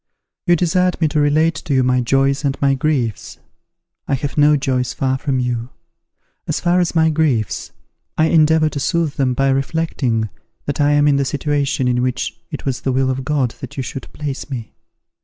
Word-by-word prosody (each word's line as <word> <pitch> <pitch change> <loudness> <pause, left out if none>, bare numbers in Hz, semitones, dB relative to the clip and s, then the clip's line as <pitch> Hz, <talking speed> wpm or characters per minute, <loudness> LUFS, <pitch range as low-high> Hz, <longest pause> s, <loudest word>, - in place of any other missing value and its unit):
"You 175 - +5
desired 180 +2 +1
me 160 - +3
to 150 - 0
relate 155 +3 +3
to 145 - -3
you 130 - +3
my 125 0 +2
joys 135 +3 +1
and 140 -1 -1
my 140 -1 +3
griefs. 130 -6 -1 0.7
I 140 - +1
have 140 +2 -4
no 150 0 +5
joys 130 -2 -1
far 130 0 0
from 135 -2 -1
you. 120 -1 -2 0.8
As - - -1
far 175 +1 +2
as 175 -1 0
my 160 -1 +4
griefs, 145 -9 0 0.5
I 155 - +4
endeavour 160 -1 +4
to 145 - -5
soothe 165 +1 0
them 130 -2 +1
by 135 +1 +2
reflecting 135 -5 0 0.4
that 145 +1 -2
I 145 0 +3
am 145 0 +4
in 140 -1 +4
the 140 - +2
situation 140 -1 -1
in 125 0 +1
which 125 0 -2
it - - -7
was 135 -2 -2
the 135 - -1
will 130 0 +1
of 130 0 -3
God 130 -3 0
that 130 - -8
you 135 - -1
should 135 - -7
place 145 -1 -5
me. 120 -5 -6
140 Hz, 195 wpm, -19 LUFS, 130-155 Hz, 0.8 s, You